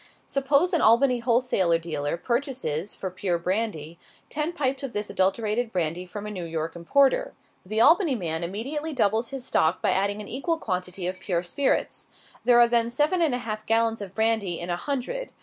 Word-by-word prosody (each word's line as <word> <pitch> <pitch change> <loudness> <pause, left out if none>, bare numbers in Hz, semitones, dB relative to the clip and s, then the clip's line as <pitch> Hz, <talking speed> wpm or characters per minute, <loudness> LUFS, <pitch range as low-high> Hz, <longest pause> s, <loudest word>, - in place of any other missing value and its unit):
Suppose 280 +6 +1
an 335 - +3
Albany 245 +3 +4
wholesale 235 -8 +2
dealer 165 -2 -3
purchases, 235 - -2
for 190 - -5
pure 180 -1 -1
brandy, 170 -3 -3 0.3
ten 300 +3 -1
pipes 275 -5 -1
of 275 -3 -5
this 210 0 -3
adulterated 215 +4 0
brandy 175 0 -2
from 205 +2 -7
a 210 - -5
New 185 -4 -5
York 165 0 -4
importer. 265 +11 +2 0.3
The 215 +4 -1
Albany 330 - +5
man 165 -5 -1
immediately 275 - -3
doubles 225 -2 +1
his 270 -2 -5
stock 160 +3 +2
by - - +1
adding 200 +2 0
an 210 - -6
equal 325 +6 -1
quantity 180 - -4
of 185 +1 -3
pure 175 -3 -1
spirits. 265 +10 -1 0.4
There 245 -1 +6
are 240 - +7
then 235 -1 +2
seven 300 +8 +1
and 305 -7 +2
a 245 - -6
half 215 -1 -4
gallons 225 0 +2
of 195 -1 -8
brandy 220 -6 +1
in 175 +1 -3
a - - +1
hundred. 285 - -4
220 Hz, 185 wpm, -25 LUFS, 180-260 Hz, 0.4 s, are